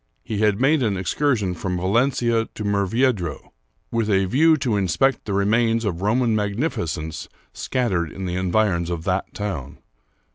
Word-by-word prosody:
He 105 Hz, -2 st, -4 dB
had 105 Hz, -1 st, +2 dB
made 140 Hz, +3 st, +3 dB
an 105 Hz, -5 st, 0 dB
excursion 105 Hz, -1 st, 0 dB
from 90 Hz, +1 st, -3 dB
Valencia 115 Hz, +4 st, +1 dB
to 105 Hz, -, -5 dB
Murviedro, 100 Hz, -, 0 dB, 0.4 s
with 115 Hz, -2 st, 0 dB
a 95 Hz, -1 st, +3 dB
view 155 Hz, -, +4 dB
to 130 Hz, -6 st, 0 dB
in 100 Hz, -2 st, +1 dB
spect 135 Hz, +8 st, +1 dB
the 100 Hz, -, -3 dB
remains 115 Hz, +3 st, +2 dB
of 90 Hz, -4 st, -2 dB
Roman 115 Hz, +2 st, +2 dB
magnificence 100 Hz, -, -2 dB, 0.2 s
scattered 95 Hz, -, -1 dB
in 95 Hz, -, -6 dB
the 90 Hz, -, -3 dB
environs 90 Hz, -2 st, +1 dB
of 85 Hz, -2 st, -3 dB
that 95 Hz, +1 st, -1 dB
town. 100 Hz, -10 st, -5 dB
105 Hz, 155 wpm, -22 LUFS, 95-120 Hz, 0.4 s, view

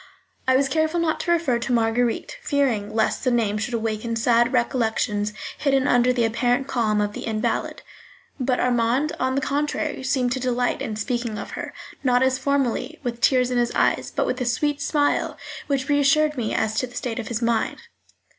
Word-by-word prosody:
I 260 Hz, -, +4 dB
was 275 Hz, +1 st, +2 dB
careful 315 Hz, +4 st, +1 dB
not 325 Hz, -2 st, 0 dB
to 345 Hz, -, -1 dB
refer 320 Hz, -8 st, +2 dB
to 235 Hz, +2 st, -3 dB
Marguerite, 235 Hz, -, 0 dB
fearing 255 Hz, -, 0 dB
lest 220 Hz, -, +1 dB
the 255 Hz, -, +2 dB
name 220 Hz, -4 st, +1 dB
should 225 Hz, +3 st, -2 dB
awaken 225 Hz, 0 st, -2 dB
sad 235 Hz, +1 st, +3 dB
recollections 220 Hz, -4 st, 0 dB, 0.3 s
hidden 275 Hz, -2 st, +2 dB
under 245 Hz, +1 st, +4 dB
the 240 Hz, -2 st, +1 dB
apparent 245 Hz, +3 st, +1 dB
calm 220 Hz, -5 st, +1 dB
of 205 Hz, 0 st, 0 dB
the -, -, -6 dB
invalid; 215 Hz, -1 st, -2 dB, 0.6 s
but 255 Hz, -1 st, 0 dB
Armand, 250 Hz, +4 st, +1 dB
on 260 Hz, 0 st, 0 dB
the 275 Hz, -, +1 dB
contrary, 290 Hz, +1 st, -1 dB
seemed 260 Hz, -2 st, 0 dB
to 260 Hz, -, -1 dB
delight 250 Hz, -1 st, 0 dB
in 215 Hz, -, -3 dB
speaking 235 Hz, 0 st, -2 dB
of -, -, -6 dB
her, -, -, -5 dB, 0.3 s
not 250 Hz, -1 st, +3 dB
as 260 Hz, 0 st, +2 dB
formerly, 280 Hz, +2 st, -1 dB
with 240 Hz, -2 st, -4 dB
tears 255 Hz, -1 st, +3 dB
in 245 Hz, -, +1 dB
his 240 Hz, 0 st, +1 dB
eyes, -, -, +1 dB
but -, -, -1 dB
with 255 Hz, -, -2 dB
a -, -, 0 dB
sweet 290 Hz, +4 st, 0 dB
smile 290 Hz, 0 st, 0 dB, 0.3 s
which 275 Hz, -2 st, -1 dB
reassured 290 Hz, +1 st, +3 dB
me 235 Hz, -5 st, -2 dB
as 220 Hz, -1 st, 0 dB
to 255 Hz, -, -2 dB
the 245 Hz, -, -15 dB
state 245 Hz, -1 st, -3 dB
of 220 Hz, -, -5 dB
his 235 Hz, 0 st, -3 dB
mind. 230 Hz, -1 st, 0 dB
245 Hz, 195 wpm, -23 LUFS, 230-275 Hz, 0.6 s, I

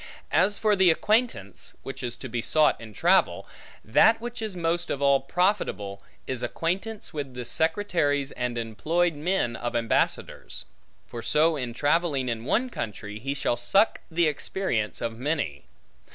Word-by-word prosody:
As 200 Hz, +1 st, +3 dB
for 215 Hz, -1 st, +3 dB
the 190 Hz, -2 st, +5 dB
acquaintance, 210 Hz, -, 0 dB
which 135 Hz, -, -7 dB
is 120 Hz, -2 st, -3 dB
to 130 Hz, -, -8 dB
be 120 Hz, -1 st, -2 dB
sought 155 Hz, +2 st, +3 dB
in 115 Hz, -1 st, -9 dB
travel; 105 Hz, -, +2 dB, 0.4 s
that 220 Hz, -, +5 dB
which 240 Hz, 0 st, -6 dB
is 215 Hz, -4 st, -4 dB
most 170 Hz, 0 st, -1 dB
of 140 Hz, -, -2 dB
all 140 Hz, -1 st, +4 dB
profitable, 135 Hz, -, -1 dB, 0.2 s
is 130 Hz, -2 st, -3 dB
acquaintance 185 Hz, -, -3 dB
with 140 Hz, -4 st, -5 dB
the 125 Hz, -1 st, -5 dB
secretaries 160 Hz, -, +1 dB
and 125 Hz, -1 st, -3 dB
employed 160 Hz, +10 st, 0 dB
men 150 Hz, -5 st, -1 dB
of 120 Hz, +1 st, -4 dB
ambassadors: 115 Hz, -1 st, -1 dB, 0.4 s
for 120 Hz, -, -7 dB
so 155 Hz, +7 st, +3 dB
in 125 Hz, -5 st, -4 dB
travelling 145 Hz, -3 st, +1 dB
in 115 Hz, 0 st, -3 dB
one 250 Hz, -, +1 dB
country, 105 Hz, -, -5 dB
he 135 Hz, +4 st, -3 dB
shall 145 Hz, -4 st, 0 dB
suck 195 Hz, -, +3 dB
the 170 Hz, 0 st, +2 dB
experience 145 Hz, -, -1 dB
of 115 Hz, 0 st, -3 dB
many. 135 Hz, -, -2 dB
145 Hz, 155 wpm, -26 LUFS, 120-180 Hz, 0.4 s, the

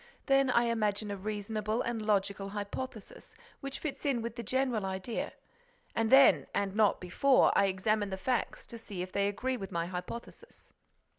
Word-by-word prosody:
Then 275 Hz, -1 st, +4 dB
I 240 Hz, -1 st, +4 dB
imagine 215 Hz, -3 st, 0 dB
a -, -, -2 dB
reasonable 215 Hz, +2 st, -2 dB
and 235 Hz, -2 st, -2 dB
logical 200 Hz, -2 st, 0 dB
hypothesis, 205 Hz, +2 st, -7 dB, 0.2 s
which 275 Hz, 0 st, -5 dB
fits 305 Hz, -4 st, -5 dB
in 260 Hz, -5 st, 0 dB
with 230 Hz, 0 st, -4 dB
the 235 Hz, -, -4 dB
general 250 Hz, -1 st, 0 dB
idea. 190 Hz, +4 st, -3 dB, 0.6 s
And 225 Hz, -1 st, 0 dB
then, 260 Hz, -, +7 dB
and 200 Hz, -1 st, 0 dB
not 210 Hz, -1 st, +3 dB
before, 255 Hz, +10 st, +3 dB
I 200 Hz, -, +5 dB
examine 205 Hz, +2 st, 0 dB
the 190 Hz, -, -4 dB
facts 245 Hz, +4 st, -2 dB
to 230 Hz, -, -9 dB
see 200 Hz, -5 st, -5 dB
if 185 Hz, -, -8 dB
they 200 Hz, +1 st, +1 dB
agree 255 Hz, +6 st, -2 dB
with 195 Hz, -4 st, -7 dB
my 170 Hz, 0 st, -1 dB
hypothesis." 180 Hz, +6 st, -8 dB
215 Hz, 170 wpm, -31 LUFS, 195-235 Hz, 0.6 s, then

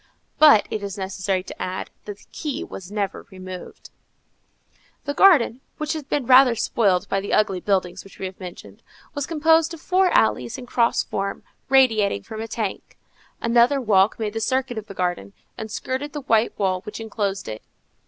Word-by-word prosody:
But 295 Hz, -9 st, +7 dB
it 215 Hz, -, -2 dB
is 200 Hz, 0 st, -5 dB
necessary 190 Hz, -1 st, -2 dB
to -, -, -10 dB
add, 185 Hz, +1 st, -4 dB
that 205 Hz, -1 st, -7 dB
the -, -, -20 dB
key 300 Hz, +2 st, -4 dB
was 190 Hz, -, -9 dB
never 205 Hz, -2 st, -3 dB
removed. 185 Hz, -1 st, -10 dB, 1.1 s
The 285 Hz, -, -2 dB
garden, 285 Hz, -9 st, +5 dB, 0.2 s
which 305 Hz, 0 st, -2 dB
had 305 Hz, -3 st, -7 dB
been 285 Hz, -4 st, 0 dB
rather 255 Hz, -1 st, +7 dB
spoiled 200 Hz, -4 st, +1 dB
by 195 Hz, -, 0 dB
the 200 Hz, -, -4 dB
ugly 195 Hz, -3 st, +2 dB
buildings 185 Hz, -2 st, -1 dB
which 195 Hz, -, -16 dB
we -, -, -5 dB
have 185 Hz, 0 st, -7 dB
mentioned, 180 Hz, -2 st, -10 dB, 0.3 s
was 285 Hz, -1 st, -3 dB
composed 325 Hz, +1 st, +3 dB
of -, -, -14 dB
four 370 Hz, +3 st, +2 dB
alleys 120 Hz, -, +1 dB
in 250 Hz, -, -8 dB
cross 235 Hz, -1 st, +1 dB
form, 195 Hz, 0 st, -4 dB, 0.3 s
radiating 220 Hz, -, +3 dB
from 220 Hz, -, -7 dB
a 225 Hz, -, -5 dB
tank. 215 Hz, -3 st, -5 dB, 0.4 s
Another 240 Hz, +4 st, +3 dB
walk 205 Hz, -4 st, +3 dB
made 215 Hz, -2 st, -3 dB
the 225 Hz, -, -2 dB
circuit 255 Hz, -1 st, -1 dB
of 215 Hz, -, -12 dB
the 195 Hz, -, -10 dB
garden, 175 Hz, -, -2 dB, 0.2 s
and 220 Hz, -, -7 dB
skirted 260 Hz, +6 st, -4 dB
the 295 Hz, -, -4 dB
white 230 Hz, -3 st, +1 dB
wall 185 Hz, -2 st, 0 dB
which 210 Hz, +3 st, -8 dB
enclosed 205 Hz, -3 st, -3 dB
it. 110 Hz, 0 st, -6 dB
215 Hz, 185 wpm, -23 LUFS, 190-265 Hz, 1.1 s, But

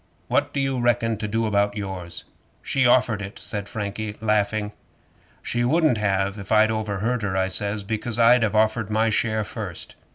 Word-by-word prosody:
"What -, -, +1 dB
do -, -, -2 dB
you 135 Hz, -2 st, 0 dB
reckon 120 Hz, -2 st, +1 dB
to 105 Hz, 0 st, -4 dB
do 115 Hz, +2 st, 0 dB
about 100 Hz, -1 st, +1 dB
yours?" 95 Hz, -4 st, -6 dB, 0.4 s
'"She 135 Hz, -2 st, +2 dB
offered 120 Hz, -4 st, +3 dB
it," 100 Hz, 0 st, -7 dB
said 105 Hz, -1 st, -5 dB
Frankie, 105 Hz, 0 st, -4 dB
laughing. 105 Hz, -1 st, 0 dB, 0.7 s
'"She 120 Hz, 0 st, -1 dB
wouldn't 150 Hz, -2 st, +3 dB
have 100 Hz, 0 st, 0 dB
if 100 Hz, -, -9 dB
I'd 110 Hz, 0 st, +5 dB
overheard 110 Hz, +2 st, -1 dB
her," 100 Hz, -2 st, -1 dB
I 95 Hz, 0 st, +1 dB
says; 100 Hz, +2 st, -2 dB
"because 110 Hz, +2 st, -3 dB
I'd 120 Hz, +1 st, +6 dB
have 110 Hz, -1 st, 0 dB
offered 110 Hz, 0 st, +2 dB
my 110 Hz, +1 st, +2 dB
share 110 Hz, 0 st, 0 dB
first." 100 Hz, -, -7 dB
110 Hz, 175 wpm, -24 LUFS, 100-115 Hz, 0.7 s, I'd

